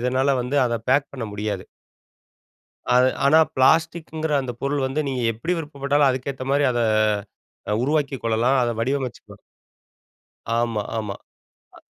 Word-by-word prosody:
இதனால 130 +2 +1
வந்து, 135 +4 0
அத 120 - -1
பேக் 140 +1 +2
பண்ண 125 -4 -4
முடியாது. 105 +1 -4 1.3
அத 125 - +6 0.2
ஆனா 155 +3 +6 0.2
பிளாஸ்டிக்ங்கிற 160 +2 +1
அந்த 125 -2 -5
பொருள் 140 0 -1
வந்து, 135 +3 -3
நீங்க 130 -2 -2
எப்டி 165 +11 -2
விருப்பப்பட்டாலும், 145 -2 +1
அதுக்கேத்த 130 0 -3
மாரி 145 +1 +3
அத 120 - -1 0.9
அ - - +2
உருவாக்கிக் 140 -2 0
கொள்ளலாம், 115 +4 +2
அத 120 - 0
வடிவமைச்சுக்கலாம். 130 +1 -3 1.2
ஆமா, 115 -2 0 0.2
ஆமா. 105 -3 -3 0.6
அ. - - -15
130 Hz, 130 wpm, -23 LUFS, 120-145 Hz, 1.3 s, அத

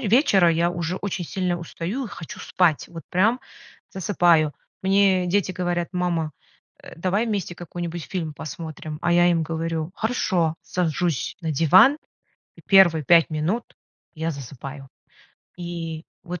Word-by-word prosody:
вечера 205 - +4
я 165 +1 +2
уже 175 +1 -3
очень 190 -3 -3
сильно 180 0 -1
устаю, 180 +9 -4
и - - -9
хочу 165 - -9
спать, 175 -5 +1
вот 165 -1 -9
прям 215 +7 +2 0.5
засыпаю. 175 -5 +2 0.3
Мне 190 -1 +3
дети 190 +1 +1
говорят: 175 -1 -1
"Мама, 175 -3 -1 0.5
э, - - -11
давай 190 +6 0
вместе 200 -5 -2
какой-нибудь 175 -1 -6
фильм 165 -5 -4
посмотрим." 155 +1 -7
А 175 - +2
я 175 0 +5
им 165 -2 +2
говорю: 160 0 -3
"Хорошо." 190 -8 0
Сажусь 165 -7 -1
на 165 -3 -2
диван, 180 - +6 0.6
и - - -16
1 175 -5 +6
5 165 +3 +5
минут 165 +9 -1 0.5
я 160 +1 -3
засыпаю. 135 0 -8 0.7
И 165 -2 -5 0.2
вот, 180 -1 -6
175 Hz, 140 wpm, -23 LUFS, 160-185 Hz, 0.7 s, диван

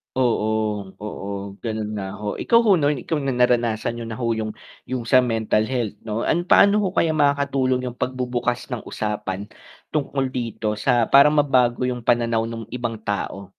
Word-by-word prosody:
Oo, 110 -5 0
oo. 100 -1 -6
Ganun 110 -2 -3
nga 95 -1 -4
ho, 105 -1 -3
ikaw 230 -1 +3
ho, 210 -5 +5
'no, 145 -3 +2
ikaw 145 +3 -3
na 135 - 0
naranasan 120 -2 +1
nyo 120 - -6
na 115 +2 -6
ho 120 - -1
'yung 110 -1 -3 0.3
yung 125 -2 -4
sa 130 0 +5
mental 110 -2 +1
health 115 -3 -2
'no, 110 +1 -3
an 175 +2 +1
paano 200 +3 +5
ho 185 - 0
kaya 160 -4 +1
makakatulong 140 -3 +1
yung 120 - -6
pagbubukas 125 -1 -2
ng 125 -4 -5
usapan 105 -2 -4 0.5
tungkol 135 -2 0
dito 115 -4 -3
sa 120 +1 +2
para 140 +2 +7
mabago 130 -4 +2
yung 125 -2 -3
pananaw 115 -1 +2
nung 115 -1 -6
ibang 120 -3 -3
tao? 100 -2 -4
120 Hz, 170 wpm, -22 LUFS, 110-130 Hz, 0.5 s, para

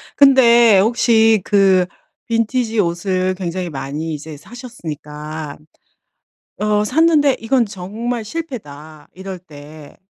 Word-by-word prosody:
근데 240 -6 +6
혹시 225 0 +3
그 195 -3 +3 0.4
빈티지 230 0 -1
옷을 185 +1 0
굉장히 180 -1 -4
많이 145 +3 -5
이제 150 0 -8
사셨으니까 155 - -8 1.0
어 210 0 +1
샀는데 295 +2 +3
'이건 240 +2 +1
정말 215 +4 -5
실패다.' 155 - -8
이럴 190 0 -8
때 150 -3 -14
195 Hz, 215 characters per minute, -18 LUFS, 160-235 Hz, 1.0 s, 근데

